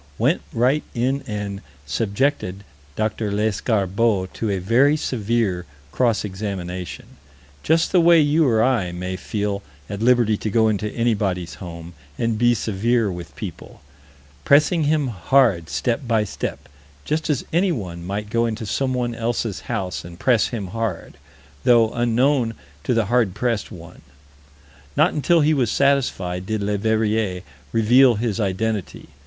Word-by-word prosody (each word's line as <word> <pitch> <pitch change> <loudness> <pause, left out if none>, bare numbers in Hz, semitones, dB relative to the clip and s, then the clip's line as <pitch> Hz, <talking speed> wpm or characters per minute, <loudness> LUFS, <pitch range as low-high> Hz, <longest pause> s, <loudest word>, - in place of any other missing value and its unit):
Went - - +2
right 130 +6 +2
in 130 +4 0
and 105 -2 -4 0.2
"subjected 100 - -1 0.3
Dr. 110 -1 -1
Lescarbault 105 -1 0
to 110 - -3
a 100 - 0
very 120 +11 +3
severe 110 - -1 0.2
cross 115 - +1
examination" 95 -3 -5 0.6
just 165 +1 +2
the 180 - +5
way 170 0 +6
you 150 +1 +3
or 110 -3 +3
I 115 -9 +1
may 90 +1 -4
feel 100 +1 -3 0.3
at 100 +1 -6
liberty 120 -3 +3
to 110 - -3
go 110 +1 +3
into 105 0 -1
anybody's 100 -8 -1
home 85 -1 -8 0.2
and 115 -2 -1
be 120 0 +4
severe 110 +1 0
with 85 -2 -8
people - - -8 0.6
"pressing 150 - +4
him 150 -2 +1
hard 100 - +2
step 125 +1 -1
by 110 -2 +2
step" 105 - -5 0.4
just 160 +1 -1
as 145 -5 0
anyone 115 - -1
might 105 +3 -4
go 115 +1 +2
into 110 0 -4
someone 125 +1 -1
else's 115 -2 -2
house 95 -10 -3
and 85 0 -11
press 120 -4 +3
him 105 -6 -5
hard, 110 -4 -4 0.5
though 115 -2 +5
unknown 120 0 +1 0.3
to 125 - +1
the 115 -2 +2
hard 110 -3 +1
pressed 115 -1 -1
one. 85 -1 -12 1.0
Not - - +4
until 165 +3 +3
he 155 +1 +3
was 130 -6 +1
satisfied, 105 -10 0
did 110 -2 -2
Leverrier 105 -2 0 0.3
reveal 120 +3 +5
his 110 -1 -2
identity. 100 0 -2
110 Hz, 140 wpm, -22 LUFS, 100-125 Hz, 1.0 s, way